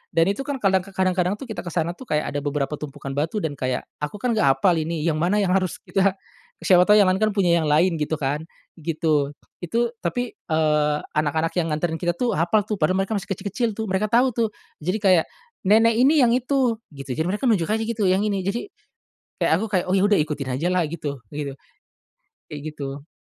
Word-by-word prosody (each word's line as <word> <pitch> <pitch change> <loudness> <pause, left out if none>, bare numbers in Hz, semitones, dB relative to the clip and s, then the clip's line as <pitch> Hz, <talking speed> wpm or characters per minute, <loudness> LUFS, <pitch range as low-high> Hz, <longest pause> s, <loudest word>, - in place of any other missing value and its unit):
Dan 165 +4 +4
itu 275 +8 -5
kan 285 - -1
kadang 190 -1 +4
ka 190 +1 -12
kadang-kadang 185 0 +1
tuh 240 - -9
kita 220 -5 -6
ke 175 - -7
sana 170 0 -1
tuh 240 +8 -12
kayak 150 0 0
ada 145 - -2
beberapa 145 0 -2
tumpukan 140 -2 -7
batu 160 +9 -2
dan 160 - -1
kayak, 130 -1 -1 0.2
aku 150 +7 -4
kan 240 +4 -1
nggak 215 -11 +2
hafal 160 +6 +3
ini 160 0 -2
yang 155 -2 0
mana 200 +5 +2
yang 180 - +1
harus 185 -1 +1
kita 195 0 +1 0.5
siapa 180 -1 +5
tahu 210 - +7
yang 200 -3 +5
lain 190 - 0
kan 215 -1 +1
punya 175 -4 +3
yang 155 - -1
lain 165 +2 +3
gitu 150 +1 -1
kan, 150 +3 -2 0.3
gitu. 150 -3 0 0.2
Itu 230 +7 -1
tapi, 245 +7 -2
eee, 150 -2 +1 0.2
anak-anak 160 +2 0
yang 165 - 0
nganterin 160 +1 -2
kita 175 -1 0
tuh 240 +5 0
hafal 175 +7 +2
tuh, 210 -1 -4
padahal 160 +4 +2
mereka 195 - -8
masih 200 -3 -2
kecil-kecil 205 +4 -2
tuh, 220 - -3
mereka 190 +3 +1
tahu, 245 +4 +3
tuh. 230 0 0 0.3
Jadi, 180 +6 -1
kayak, 185 -4 +5 0.4
"Nenek 225 +2 +6
ini 285 +2 +5
yang 235 - +4
itu." 250 -2 +1
Gitu. 135 -2 -7
Jadi, 160 - +1
mereka 210 +7 0
nunjuk 175 -7 +1
aja 220 +1 0
gitu, 220 -3 -1
yang 190 +2 +3
ini, 195 -3 -1
jadi, 235 - -3 0.7
kayak - - +2
aku 210 +6 -2
kayak, 180 -2 +2
"Oh, 190 - +2
ya 190 - +3
udah, 205 -1 +4
ikutin 145 -3 -2
aja 155 +8 -1
lah" 180 -1 +2
Gitu, 150 -2 -4 0.2
begitu. 145 -1 -4 1.0
Kayak 145 -1 -6
gitu. 140 0 -7
180 Hz, 220 wpm, -23 LUFS, 155-210 Hz, 1.0 s, tahu